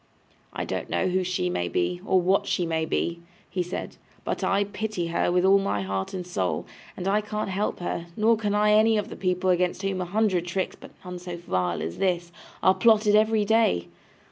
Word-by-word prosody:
'I -, -, -3 dB
don't -, -, -4 dB
know 185 Hz, -, +1 dB
who 185 Hz, +1 st, +1 dB
she 180 Hz, -, -1 dB
may 90 Hz, 0 st, -1 dB
be, 90 Hz, +1 st, -1 dB
or 185 Hz, -, +3 dB
what 195 Hz, +3 st, +2 dB
she 180 Hz, -, 0 dB
may 160 Hz, -1 st, 0 dB
be,' 170 Hz, +1 st, -2 dB, 0.3 s
he 185 Hz, -, -2 dB
said: 180 Hz, +1 st, -5 dB, 0.3 s
'but -, -, -3 dB
I 200 Hz, +1 st, +2 dB
pity 205 Hz, -3 st, -3 dB
her 170 Hz, -, +1 dB
with 180 Hz, +1 st, +2 dB
all 195 Hz, +1 st, +6 dB
my 150 Hz, -, -1 dB
heart 95 Hz, 0 st, -3 dB
and 180 Hz, -1 st, -4 dB
soul; 90 Hz, -, -2 dB, 0.3 s
and 180 Hz, -, -4 dB
I 205 Hz, +2 st, +2 dB
can't 210 Hz, -1 st, -3 dB
help 195 Hz, +2 st, -2 dB
her, 170 Hz, -1 st, -3 dB
nor 225 Hz, +1 st, +4 dB
can 210 Hz, -2 st, -1 dB
I 210 Hz, 0 st, +4 dB
any 220 Hz, +1 st, +5 dB
of 210 Hz, -, -2 dB
the -, -, -7 dB
people 185 Hz, 0 st, +1 dB
against 180 Hz, +1 st, 0 dB
whom 195 Hz, -1 st, -1 dB
a -, -, -2 dB
hundred 190 Hz, -2 st, +1 dB
tricks, 185 Hz, +2 st, -2 dB
but -, -, -13 dB, 0.2 s
none 180 Hz, 0 st, -6 dB
so 175 Hz, -1 st, -6 dB
vile 90 Hz, -, -1 dB
as 80 Hz, -, -5 dB
this, 175 Hz, -2 st, 0 dB, 0.3 s
are 185 Hz, -, +6 dB
plotted 215 Hz, -1 st, +4 dB
every 215 Hz, 0 st, +3 dB
day! 200 Hz, -, +2 dB
185 Hz, 215 wpm, -26 LUFS, 170-205 Hz, 0.3 s, all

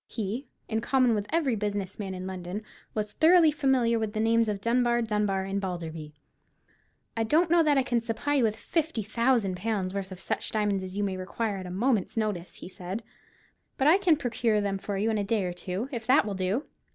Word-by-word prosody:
He, 225 Hz, +5 st, -4 dB, 0.2 s
in 220 Hz, 0 st, -1 dB
common 255 Hz, -1 st, +3 dB
with 205 Hz, -1 st, -1 dB
every 305 Hz, -7 st, +1 dB
business 205 Hz, -2 st, -3 dB
man 195 Hz, -2 st, -4 dB
in 185 Hz, 0 st, -6 dB
London, 185 Hz, +2 st, -5 dB, 0.3 s
was 210 Hz, -1 st, -2 dB
thoroughly 330 Hz, -1 st, +6 dB
familiar 265 Hz, -6 st, +2 dB
with 220 Hz, -1 st, -2 dB
the 215 Hz, -, -2 dB
names 225 Hz, 0 st, +3 dB
of 205 Hz, -1 st, -2 dB
Dunbar, 240 Hz, +2 st, +2 dB
Dunbar, 210 Hz, -3 st, 0 dB
and 195 Hz, +1 st, -2 dB
Balderby. 165 Hz, -5 st, -5 dB, 1.0 s
"I 225 Hz, -, -1 dB
don't 320 Hz, +9 st, +2 dB
know 345 Hz, 0 st, +6 dB
that 300 Hz, -3 st, +3 dB
I 270 Hz, -, +4 dB
can 240 Hz, -2 st, 0 dB
supply 230 Hz, +5 st, -2 dB
you 275 Hz, -4 st, +3 dB
with 215 Hz, -2 st, +2 dB
fifty 315 Hz, -2 st, -2 dB
thousand 230 Hz, -3 st, +1 dB
pounds' 195 Hz, -2 st, -2 dB
worth 195 Hz, -1 st, -4 dB
of 185 Hz, -, -8 dB
such -, -, -2 dB
diamonds 205 Hz, -3 st, +1 dB
as 185 Hz, +1 st, -7 dB
you 205 Hz, -, +1 dB
may 190 Hz, -2 st, -1 dB
require 200 Hz, +3 st, -3 dB
at 185 Hz, -1 st, -6 dB
a -, -, -6 dB
moment's 215 Hz, +2 st, 0 dB
notice," 205 Hz, -5 st, -2 dB
he -, -, -9 dB
said; 185 Hz, +4 st, -6 dB, 0.7 s
"but 265 Hz, -, +1 dB
I 345 Hz, +6 st, +6 dB
can 350 Hz, -6 st, +4 dB
procure 235 Hz, -4 st, +1 dB
them 200 Hz, -1 st, -1 dB
for 200 Hz, 0 st, -4 dB
you 215 Hz, +3 st, +1 dB
in 215 Hz, -, 0 dB
a -, -, 0 dB
day 210 Hz, 0 st, 0 dB
or 180 Hz, -1 st, -2 dB
two, 185 Hz, +6 st, -4 dB
if 230 Hz, -4 st, -5 dB
that 270 Hz, +2 st, +5 dB
will 205 Hz, -, -3 dB
do?" 190 Hz, +9 st, -1 dB
215 Hz, 220 wpm, -28 LUFS, 195-245 Hz, 1.0 s, thoroughly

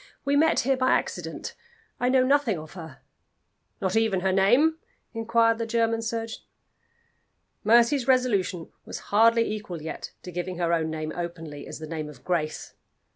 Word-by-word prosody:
"We 280 Hz, +1 st, +2 dB
met 320 Hz, +3 st, +4 dB
here 270 Hz, +1 st, +1 dB
by 255 Hz, 0 st, +3 dB
accident. -, -, -3 dB, 0.5 s
I 245 Hz, -, +2 dB
know 260 Hz, 0 st, +4 dB
nothing 270 Hz, -7 st, +2 dB
of 155 Hz, 0 st, -10 dB
her." 160 Hz, -7 st, -10 dB, 0.8 s
"Not 190 Hz, 0 st, -1 dB
even 220 Hz, -4 st, +2 dB
her 190 Hz, 0 st, +1 dB
name?" 250 Hz, +13 st, +4 dB, 0.3 s
inquired 230 Hz, 0 st, +2 dB
the 230 Hz, -, -2 dB
German 230 Hz, 0 st, +1 dB
surgeon. 225 Hz, 0 st, -4 dB, 1.2 s
Mercy's 235 Hz, +4 st, +4 dB
resolution 205 Hz, -10 st, +1 dB
was -, -, -7 dB, 0.2 s
hardly 230 Hz, +2 st, +5 dB
equal 205 Hz, -5 st, -6 dB
yet 160 Hz, -, -6 dB
to 180 Hz, -, -7 dB
giving 180 Hz, +1 st, -4 dB
her 170 Hz, -1 st, +1 dB
own 160 Hz, -1 st, +1 dB
name 155 Hz, 0 st, -4 dB
openly 165 Hz, -4 st, -6 dB
as -, -, -7 dB
the 155 Hz, -, -7 dB
name 155 Hz, -1 st, -5 dB
of 140 Hz, -4 st, -14 dB
Grace. 155 Hz, -4 st, -2 dB
215 Hz, 160 wpm, -26 LUFS, 170-235 Hz, 1.2 s, hardly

